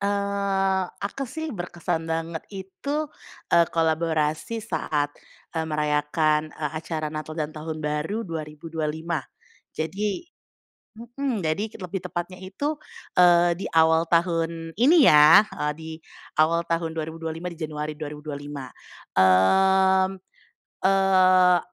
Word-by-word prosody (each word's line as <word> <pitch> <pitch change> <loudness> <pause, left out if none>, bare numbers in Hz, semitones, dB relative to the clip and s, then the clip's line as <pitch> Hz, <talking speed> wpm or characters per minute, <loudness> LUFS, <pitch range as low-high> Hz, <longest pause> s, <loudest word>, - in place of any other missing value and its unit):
Eee, 200 -1 0 0.2
aku 275 +7 -4
sih 315 0 -5
berkesan 175 -3 -3
banget 165 0 -2
itu, 195 +10 -5 0.6
eee, 170 0 +6
kolaborasi 160 +4 0
saat, 150 -3 -1 0.4
eee, 160 - 0
merayakan, 150 0 +1
eee, 150 -2 -3
acara 155 -2 -3
Natal 155 +1 -6
dan 155 -1 -3
Tahun 155 0 -6
Baru 150 +10 -2
2025. 160 0 -4 0.6
Jadi 200 - -2 0.7
mhm, 240 -1 -3
jadi 200 +8 -1
lebih 185 0 -5
tepatnya 175 +1 -4
itu, 285 +12 -3 0.4
eee, 175 -1 +6
di 195 - -5
awal 160 0 +5
tahun 165 -1 0
ini 280 +5 +6
ya, 155 +8 +8
eee, 150 0 -2
di 160 0 -8 0.5
awal 165 +2 +3
tahun 165 -1 0
2025, 160 +1 -5
di 170 - -9
Januari 155 -1 -4
2025. 145 -2 -7 0.5
Mmm, 190 - +4 0.7
eee, 185 -2 +5
165 Hz, 110 wpm, -25 LUFS, 155-190 Hz, 0.7 s, ya